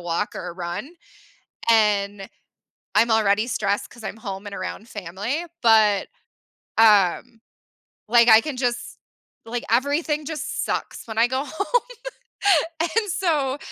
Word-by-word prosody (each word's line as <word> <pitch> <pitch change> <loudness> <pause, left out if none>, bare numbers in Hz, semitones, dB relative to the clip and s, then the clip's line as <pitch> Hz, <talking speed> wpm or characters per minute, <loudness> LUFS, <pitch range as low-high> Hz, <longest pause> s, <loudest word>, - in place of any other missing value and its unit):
walk 175 +4 -2
or - - -5
a - - -6
run, 175 - -5 0.8
and 205 -3 +2 0.7
I'm 225 +2 +4
already 215 0 +3
stressed 205 -4 -1
'cause 235 -2 -14
I'm - - -5
home 195 -1 -7
and 200 - -7
around 225 - -6
family, 205 - -4 0.2
but, 215 -3 +4 0.7
um, 220 +2 +4 0.7
like, 235 +1 +5
I 220 0 +9
can 295 -2 -5
just, 245 -1 -3 0.5
like, 240 +1 -4
everything 290 +5 +1
just 315 -2 -3
sucks - - -4
when 220 0 -6
I 230 - +5
go 260 +2 -1
home, 400 - -1 1.0
and 405 +5 0
so 295 -7 0
225 Hz, 130 wpm, -23 LUFS, 205-270 Hz, 1.0 s, I